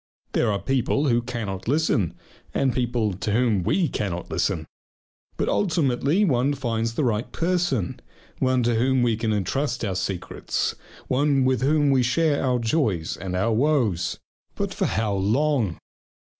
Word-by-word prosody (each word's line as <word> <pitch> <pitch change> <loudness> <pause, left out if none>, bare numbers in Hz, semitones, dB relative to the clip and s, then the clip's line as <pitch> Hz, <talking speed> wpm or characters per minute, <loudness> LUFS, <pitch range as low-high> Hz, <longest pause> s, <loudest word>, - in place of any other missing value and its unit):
There 115 - +1
are 100 - 0
people 135 +6 0
who 120 0 +3
cannot 115 -6 -5
listen 135 - +1 0.4
and 130 -2 +2
people 120 -4 0
to 100 +3 -3
whom 115 -4 +2
we 155 - +1
cannot 90 -9 -4
listen. 85 0 0 0.7
But - - 0
ultimately 160 0 +2
one 140 -2 +2
finds 115 -3 -2
the 150 - 0
right 115 -2 -1
person, 170 - 0 0.4
one 130 -1 +2
to 120 0 +2
whom 125 +2 +2
we 115 -2 +2
can 110 0 -1
entrust 120 +5 -1
our 100 - -1
secrets, 95 -1 -2 0.3
one 135 0 +2
with 130 -1 +2
whom 145 +1 +3
we 130 -1 +4
share 145 +4 +1
our 125 -2 +2
joys 110 - 0
and 90 0 -5
our 110 +5 +1
woes. 120 - +1 0.4
But - - -2
for - - -1
how 105 +2 0
long? 110 - +1
120 Hz, 155 wpm, -24 LUFS, 105-140 Hz, 0.7 s, we